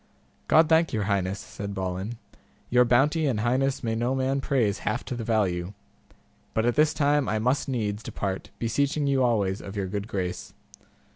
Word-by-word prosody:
God 160 0 +5
thank 165 +1 +3
your 110 -2 0
highness, 100 -1 0
said 100 -2 -7
Balin, 95 +4 -3 0.5
your 125 0 +6
bounty 145 +6 +3
and 115 -6 0
highness 130 +4 0
may 115 -1 0
no 120 +3 0
man 135 +1 0
praise 120 -8 +1
half 125 - -2
to 125 - -4
the 120 - -4
value; 100 -5 0 0.8
but 110 - +2
at 120 - +3
this 150 +2 +4
time 145 -1 +2
I 110 - +1
must 125 +6 0
needs 105 -5 -2
depart, 100 -4 -4
beseeching 140 +5 0
you 135 -1 +2
alway 110 -6 +2
of 100 - -8
your 100 -2 -1
good 100 +2 -4
grace. 90 -4 -4
115 Hz, 180 wpm, -26 LUFS, 100-135 Hz, 0.8 s, your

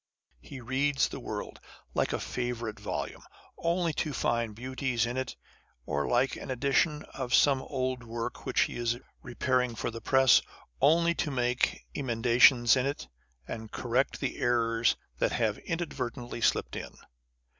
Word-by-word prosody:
He 135 - -10
reads 135 +3 +1
the - - -6
world, - - -6 0.3
like - - +1
a - - -1
favourite 120 -3 -3
volume, - - -4 0.4
only 170 -1 +1
to 150 0 -2
find 115 -4 0
beauties 125 0 -1
in 120 +1 -3
it, 130 -1 -3 0.5
or 70 +1 -1
like 125 +2 +2
an - - -8
edition 140 +4 +1
of 130 -2 0
some 135 -2 +4
old 130 -2 -2
work 115 0 -5
which - - +1
he - - 0
is 120 0 0 0.2
Preparing 125 0 0
for 120 - -3
the 115 0 -7
press, 130 -2 +5 0.4
only 170 +2 +5
to 165 - -2
make 125 -2 0
emendations 120 -1 +5
in 130 0 +1
it, 140 - -4 0.4
and 110 -1 -6
correct 125 +2 0
the 135 - -2
errors 115 -1 +2 0.2
that - - +1
have 110 -3 0
inadvertently 125 -8 -4
slipt - - +1
in. - - -6
125 Hz, 150 wpm, -29 LUFS, 120-135 Hz, 0.5 s, press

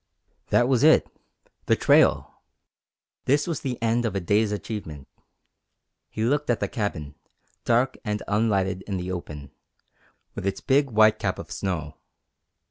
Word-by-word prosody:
That 120 - +3
was 130 -3 +2
it 155 +2 +5 0.6
the - - +4
trail! - - +2 0.8
This 145 +2 +2
was 165 -4 -3
the 125 -3 -4
end 115 +1 +1
of 110 -4 -2
a - - +1
day's 100 +4 +1
achievement. 100 -10 -6 1.0
He 110 - -4
looked 145 +5 0
at 120 - +1
the - - -1
cabin, 80 -10 -4 0.5
dark 120 +3 +1
and 105 -2 -3
unlighted 100 -3 0
in 100 -2 -2
the 90 +1 -4
open, 75 -6 -7 0.8
with 100 - -4
its 95 - -2
big 140 +1 +2
white 110 -1 +4
cap - - -2
of - - -9
snow. 80 -5 -4
105 Hz, 145 wpm, -25 LUFS, 95-120 Hz, 1.0 s, it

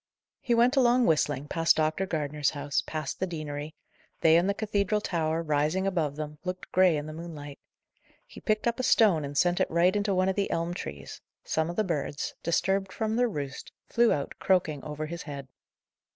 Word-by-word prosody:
He 240 - +1
went 240 +3 +4
along 250 -2 +4
whistling, 150 -3 +1
past 165 +2 +3
Dr. 155 +5 0
Gardner's 150 -3 0
house, 145 -1 -1
past 155 -3 -4
the 190 - 0
deanery; 150 -2 -5 0.5
they 160 0 +6
and 175 +4 +3
the 200 - 0
cathedral 210 -1 0
tower, 165 -4 -1
rising 155 +4 +1
above 165 -7 0
them, 150 0 -6
looked 185 0 -5
grey 185 -4 +4
in 145 - -4
the 155 - -7
moonlight. 155 -4 -8 0.7
He - - -13
picked 215 -1 0
up 235 +1 0
a - - -1
stone 215 -10 +4
and 140 0 -5
sent 175 +2 +3
it - - +1
right 175 +3 +3
into 205 -1 +1
one 185 +1 +2
of 190 - +1
the 200 -1 0
elm 170 +1 -1
trees; 70 - -7 0.2
some 160 +1 -1
of 175 - -4
the 215 - +2
birds, 150 -5 -3
disturbed 190 +3 0
from 220 +1 -2
their 245 0 +2
roost, 145 -7 -6 0.2
flew 235 0 +4
out, 140 - -1
croaking, 165 -6 +1
over 150 0 -4
his 170 +2 -6
head. 140 -3 -7
165 Hz, 195 wpm, -28 LUFS, 150-195 Hz, 0.7 s, they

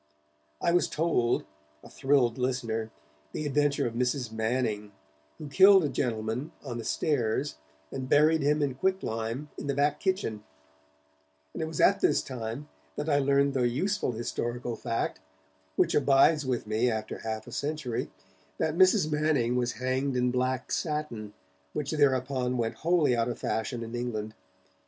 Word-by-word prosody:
I - - +1
was 175 +1 +3
told, 150 -7 +1 0.4
a - - -11
thrilled 135 -4 +1
listener, 115 -3 -1 0.4
the 155 - -3
adventure 145 0 +1
of 115 - -2
Mrs. 125 0 -1
Manning, 110 -2 -1 0.4
who 150 - -7
killed 190 +5 +7
a 150 - 0
gentleman 115 +2 -2
on 120 -4 -5
the - - -5
stairs 130 - 0 0.3
and 130 -1 -5
buried 155 +2 +5
him 150 +1 +2
in 140 -2 0
quick 190 +9 0
lime 115 +6 -3
in - - -6
the 140 - 0
back 145 +1 +1
kitchen, 185 - -1 1.1
and - - -5
it 160 - -1
was 160 -1 -6
at 200 +1 +5
this 150 - +2
time 125 +2 -5 0.3
that 150 +2 -3
I 145 -1 +4
learned 140 0 +3
the 125 -3 +2
useful 165 - -1
historical 120 +1 -3
fact, 115 0 -2 0.6
which - - +2
abides 140 +1 +4
with 125 -4 -1
me 110 +3 +1
after 110 -1 -3
half 110 -1 -4
a - - -11
century, 145 -5 -3 0.5
that 160 - 0
Mrs. 185 -3 +4
Manning 150 -6 +1
was 120 -1 0
hanged 130 +2 -1
in 125 0 +2
black 130 0 -1
satin, 150 -10 -3 0.4
which 145 -2 -3
thereupon 130 -3 +1
went 115 -1 -2
wholly 160 -6 +3
out 115 0 0
of 120 - -4
fashion 115 +1 -2
in 115 +1 -8
England. 110 -3 -3
130 Hz, 160 wpm, -28 LUFS, 120-150 Hz, 1.1 s, killed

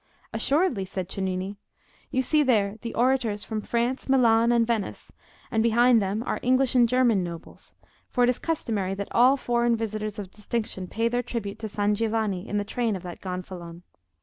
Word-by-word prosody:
"Assuredly," 270 - +1
said 185 -1 -4
Cennini; 190 +1 -3 0.5
"you 260 - 0
see 305 +4 +3
there 215 -7 +2
the 230 - -5
Orators 240 -4 +1
from 220 -1 -4
France, 240 +5 -1
Milan, 235 -3 +4
and 235 -1 +3
Venice, 225 -4 -3 0.4
and 225 - +2
behind 235 +1 +4
them 200 +3 -1
are - - -2
English 255 +1 +2
and 240 -2 +4
German 240 -6 +3
nobles; 170 -1 -9 0.3
for 245 - +1
it 245 - +4
is 250 - -5
customary 215 - -1
that 200 0 -5
all 255 +4 +5
foreign 240 -2 +1
visitors 215 -1 -3
of 195 -3 -7
distinction 210 -3 -4
pay 225 +5 0
their 245 +1 0
tribute 225 -4 -5
to 220 - -5
San 205 0 +1
Giovanni 215 -3 -1
in 205 - -1
the 205 - 0
train 230 0 -1
of 185 - -7
that 175 -2 -8
gonfalon. 180 -2 -7
225 Hz, 180 wpm, -26 LUFS, 200-240 Hz, 0.5 s, all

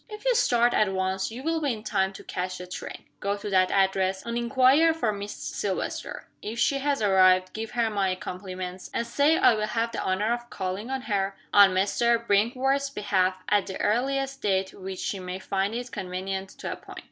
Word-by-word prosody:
"If 425 +2 -9
you - - +4
start 240 - +3
at 210 -2 +3
once 190 0 -1
you 240 +4 -8
will 325 +1 0
be 285 -3 +1
in 215 -1 -8
time 195 -3 0
to - - -11
catch 185 0 -4
the 180 - -7
train. 180 - -7 0.2
Go 200 +1 -1
to 205 0 -6
that 185 -1 +4
address, 190 0 +1
and 235 0 -3
inquire 260 +7 +4
for 235 -9 0
Miss 205 0 -5
Silvester. 195 -3 -4
If 220 +2 -5
she 240 +4 +2
has 280 -4 0
arrived, 185 -2 +4
give 220 0 -5
her 235 -1 +3
my 195 -3 0
compliments, 185 0 -7
and 235 - 0
say 285 +7 +3
I - - +6
will 215 -1 -1
have 230 +1 -1
the - - -3
honor 205 +5 0
of 240 0 -6
calling 190 +4 -4
on 265 -1 -3
her 195 -3 -1 0.2
(on 200 -2 +7
Mr. 235 +5 +2
Brinkworth's 255 +7 +2
behalf) 185 -6 0
at 205 -1 +2
the 190 - -6
earliest 270 +4 0
date 190 -1 0
which 190 0 -7
she 195 - -3
may 180 0 -5
find 195 +2 -2
it 245 0 -5
convenient 190 +1 -4
to - - -7
appoint. - - -12
205 Hz, 205 wpm, -26 LUFS, 190-240 Hz, 0.2 s, on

